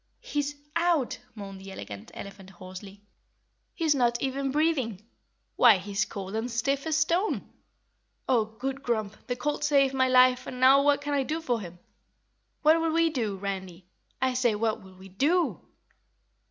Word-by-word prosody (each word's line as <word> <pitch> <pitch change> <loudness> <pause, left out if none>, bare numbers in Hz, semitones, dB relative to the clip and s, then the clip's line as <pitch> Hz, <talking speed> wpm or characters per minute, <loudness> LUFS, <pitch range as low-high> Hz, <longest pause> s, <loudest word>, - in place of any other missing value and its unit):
"He's 290 0 -3 0.2
OUT!" 335 -6 +1 0.2
moaned 195 -2 -8
the 195 0 -9
Elegant 100 - -8
Elephant 195 -1 -9
hoarsely. 190 +2 -11 0.7
"He's 320 -3 +2
not 240 -3 +1
even 270 0 -1
breathing. 270 - 0 0.6
Why, 235 -5 +7
he's 200 +2 -2
cold 195 -1 -7
and 225 +3 -2
stiff 275 +6 -1
as 315 - +1
a - - +3
stone. 340 +6 +1 0.8
Oh, 235 -4 +3
Good 265 +5 -5
Grump, 220 -5 -2
the 245 - -1
colt 295 +3 -2
saved 280 -2 +3
my 260 -1 +3
life 255 0 +4
and 250 - -6
now 265 +2 +7
what 285 0 +3
can 290 0 -3
I 280 - +2
do 305 +4 -2
for 245 -8 -1
him? 175 -2 -9 0.9
What'll 325 +2 +4
we 330 0 +3
do, 225 -8 -2
Randy? 190 -2 -5 0.3
I 260 0 +1
say, 245 -3 +2
what'll 210 -3 -2
we 190 +1 -13
DO?" 310 - +1
250 Hz, 160 wpm, -27 LUFS, 200-290 Hz, 0.9 s, Why